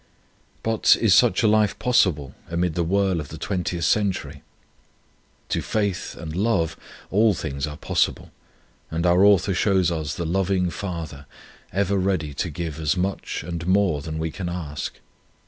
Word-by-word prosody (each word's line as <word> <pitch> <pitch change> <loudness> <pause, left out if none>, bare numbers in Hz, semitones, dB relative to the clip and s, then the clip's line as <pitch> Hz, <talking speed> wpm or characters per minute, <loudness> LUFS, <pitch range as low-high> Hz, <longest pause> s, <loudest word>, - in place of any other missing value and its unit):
But 110 -1 +4
is 110 -5 +4
such 120 +1 +4
a - - +5
life 105 -1 +3
possible 85 - +2 0.2
amid 85 0 0
the 85 - 0
whirl 95 0 +1
of 75 - -5
the 80 - -8
twentieth 90 -2 -2
century? 85 -7 0 1.1
To - - 0
faith 100 -4 -2
and 80 -1 -7
love 90 -5 +1 0.4
all 105 +1 +4
things 70 -2 -3
are 75 0 -7
possible, - - -1 0.6
and 85 +2 -2
our 90 +2 +5
author 100 -1 +5
shows 95 -2 +2
us 80 -3 -3
the 85 - -3
loving 90 +1 +1
Father, 80 -8 -6 0.4
ever 100 0 +1
ready 90 -6 -1
to 80 +5 -2
give 80 -1 -5
as 80 +2 0
much 95 -3 -2
and 85 +1 -5
more 95 -6 +2
than 80 +1 -5
we 80 0 -2
can 90 0 -5
ask. 80 -5 -5
90 Hz, 160 wpm, -23 LUFS, 80-100 Hz, 1.1 s, a